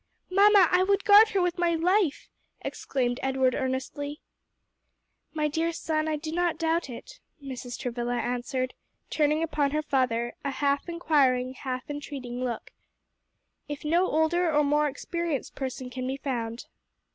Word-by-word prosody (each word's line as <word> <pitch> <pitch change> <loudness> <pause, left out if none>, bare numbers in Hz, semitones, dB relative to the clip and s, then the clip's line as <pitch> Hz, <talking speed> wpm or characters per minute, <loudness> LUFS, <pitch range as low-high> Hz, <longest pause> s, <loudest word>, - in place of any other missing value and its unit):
"Mamma, 400 -1 +6
I 360 0 +4
would 395 +1 +2
guard 425 +1 +8
her 395 -3 +1
with 355 0 -1
my 340 -1 +2
life!" 360 -1 +1 0.3
exclaimed 245 -2 -2
Edward 265 -1 +2
earnestly. 265 +3 -3 1.1
"My 305 -1 0
dear 325 +3 0
son, 315 -1 -1
I 310 - 0
do 310 +1 -5
not 350 0 0
doubt 330 -2 0
it," - - -10 0.2
Mrs. 260 -3 -7
Travilla 240 0 -2
answered, 250 +2 -2 0.4
turning 305 +1 +2
upon 300 -3 +1
her 305 +2 -1
father 250 -5 0
a 280 - -1
half 280 +3 0
inquiring, 270 -7 +2
half 255 0 -5
entreating 275 -4 -5
look. 240 -3 -4 1.0
"If 290 0 -6
no 345 +4 +3
older 320 +2 +2
or 300 0 +3
more 295 +1 +2
experienced 320 +1 -3
person 260 -1 -5
can 255 0 -4
be 265 +1 -2
found." 235 -4 -4
290 Hz, 145 wpm, -27 LUFS, 255-330 Hz, 1.1 s, guard